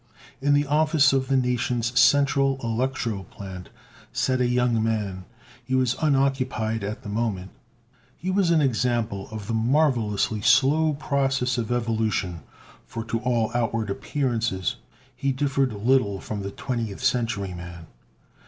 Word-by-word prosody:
In 145 +1 +3
the 145 +1 +2
office 150 0 +3
of 130 -1 +1
the 135 - +2
nation's 125 -1 0
central 135 0 +4
electro 115 -3 -1
plant 95 -1 -9 0.4
sat 130 -1 0
a 125 - +3
young 120 -2 +2
man. 105 -5 -2 0.4
He 130 +2 -1
was 130 -1 +2
unoccupied 130 -6 +1
at 105 +2 -5
the - - -8
moment. 105 -4 -2 0.7
He 185 +3 -3
was 190 -2 +2
an 165 -2 +4
example 115 -5 0
of 110 -2 -7
the 115 - -3
marvelously 115 -4 +1
slow 140 +7 +4
process 135 -3 0
of 115 0 -3
evolution, 110 -7 -1 0.4
for, 115 -1 -6
to 115 0 -2
all 115 -2 0
outward 115 -3 -1
appearances 115 -6 -1 0.4
he 135 +2 0
differed 135 -1 0
little 105 -2 +1
from 105 0 -5
a 100 - -3
Twentieth 115 -1 -4
Century 115 -7 0
man. 85 -1 -9
120 Hz, 140 wpm, -25 LUFS, 110-135 Hz, 0.7 s, central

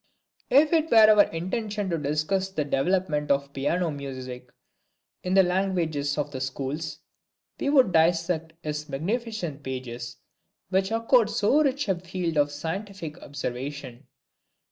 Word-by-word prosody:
If 295 +5 +5
it 325 -1 +2
were 230 - +4
our 210 -1 +7
intention 205 +3 -3
to 165 - +1
discuss 155 +7 0
the 160 -6 -2
development 150 +1 0
of 140 0 +1
Piano 165 +5 0
music 130 -3 -7 0.7
in 185 +1 -1
the 190 - +7
language 180 -3 0 0.2
of 145 -1 -2
the 130 -2 -5
Schools, 135 +4 -4 0.6
we 280 - 0
would 265 -8 +5
dissect 165 -1 +2
his 150 0 -4
magnificent 180 - -3
pages, 125 -2 -6 0.5
which 190 0 +1
afford 230 0 +3
so 230 +6 +3
rich 280 -3 0
a 195 - +3
field 175 -1 -3
for 145 0 +4
scientific 165 +2 -6
observation. 135 -1 -6
165 Hz, 135 wpm, -26 LUFS, 145-195 Hz, 0.7 s, our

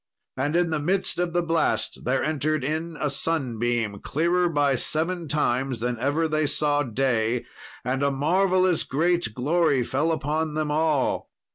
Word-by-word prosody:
And 145 +4 -1
in 175 -1 +2
the 155 - 0
midst 180 +4 0
of 175 -1 0
the 175 0 +1
blast 165 0 0
there 130 +1 +1
entered 155 -1 0
in 160 +3 -3
a 150 - 0
sunbeam, 120 -8 -1
clearer 175 +4 +1
by 145 -3 +2
seven 165 +6 -1
times 135 -3 0
than 120 0 -2
ever 145 +6 +1
they 155 -1 0
saw 145 0 +1
day, 120 -2 0 0.4
and 130 +2 -1
a 140 - +3
marvellous 180 +5 +2
great 170 -4 0
glory 145 0 +2
fell 145 +7 0
upon 155 0 -1
them 155 -1 -1
all. 150 -3 +1
150 Hz, 155 wpm, -25 LUFS, 135-165 Hz, 0.4 s, a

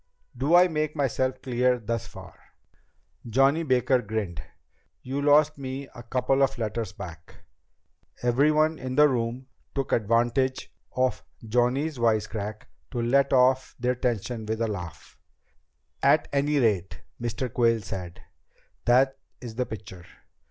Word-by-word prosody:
"Do 140 +7 +2
I 180 +1 +7
make 155 -2 -2
myself 130 -2 -1
clear 125 0 +2
thus 115 -1 -3
far?" - - -12 0.9
Johnny 135 +7 +3
Baker 130 -3 +2
grinned. 100 -7 -4 0.6
"You 135 +2 -3
lost 150 +1 +4
me 135 +1 -5
a 120 - -10
couple 130 +3 0
of 135 0 +2
letters 110 -2 -3
back." 80 -3 -11 0.8
Everyone 150 +6 +3
in 130 0 -4
the 150 +1 +7
room 125 -1 -2 0.3
took 135 -1 -2
advantage 120 +4 +1 0.2
of 130 0 0 0.2
Johnny's 125 +5 +1
wisecrack 110 -2 -1 0.2
to 120 - -4
let 135 +4 +2
off 130 0 +3
their 125 +1 +1
tension 120 -2 -2
with 110 +1 -2
a 115 - +2
laugh. 90 -6 -7 0.8
"At - - +4
any 145 +1 +2
rate," 105 -8 0 0.2
Mr. 120 +1 -3
Quayle 115 -2 +2
said, 90 -3 -7 0.6
"that 130 +3 +3 0.2
is 120 -3 -8
the 125 +2 -2
picture. 95 -4 -9
125 Hz, 130 wpm, -26 LUFS, 115-135 Hz, 0.9 s, I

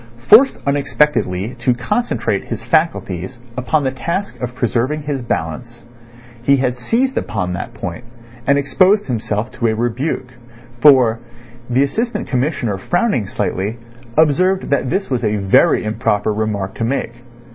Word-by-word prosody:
Forced 265 +6 +7
unexpectedly 140 -7 +1
to 125 +1 +2
concentrate 235 - -1
his - - -5
faculties 125 - 0 0.2
upon 135 +4 0
the 130 - 0
task 170 +9 -4
of 125 0 -4
preserving 130 +5 -1
his 145 -2 -3
balance, 120 +3 -4 0.6
he 140 +3 +4
had 125 -2 0
seized 235 - 0
upon 90 -4 -3
that 90 - -6
point, 85 +6 -6 0.4
and 140 0 +4
exposed 185 +9 +3
himself 110 -2 -2
to 115 - -1
a 110 - +1
rebuke; 125 +3 -2 0.5
for, 125 -5 +6 0.5
the 125 +3 +3
Assistant 230 - -2
Commissioner 125 - -1
frowning 175 - 0
slightly, 100 +6 -2 0.4
observed 180 +4 +2
that 140 -2 +1
this 190 +1 -2
was 125 -2 0
a 105 -1 +1
very 100 -2 +3
improper 110 -1 0
remark 105 -3 -2
to - - -4
make. 120 -1 -2
125 Hz, 140 wpm, -18 LUFS, 110-150 Hz, 0.6 s, Forced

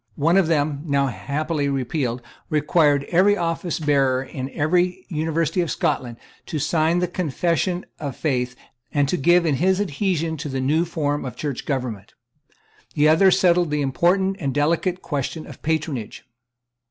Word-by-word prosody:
One 165 +5 +2
of 195 -4 +4
them, 145 -3 0
now 140 -1 +2
happily 140 - -2
repealed, 130 -2 -2 0.3
required 150 -1 +3
every 190 +4 +4
officebearer 150 -7 0
in 130 0 -5
every 180 +5 0
University 165 +1 0
of 170 - -2
Scotland 120 -2 -1 0.3
to 155 - -3
sign 160 +3 +1
the 180 0 +1
Confession 175 +2 -1
of 140 -4 -4
Faith 125 -5 -1 0.4
and 145 -1 +2
to - - +1
give 175 +2 +4
in 150 -4 +1
his 190 +4 +2
adhesion 165 -3 -1
to 150 0 -5
the 135 0 -3
new 150 +6 +1
form 145 -3 -2
of 125 -3 -6
Church 145 -5 -4
government, 125 -8 -4 0.8
The 150 +1 +4
other 170 +5 +6
settled 180 -2 +3
the 150 -1 0
important 185 +8 +1
and 140 -3 -2
delicate 170 +5 0
question 150 +1 -3
of - - -12
patronage. 145 -9 -3
155 Hz, 155 wpm, -22 LUFS, 140-175 Hz, 0.8 s, other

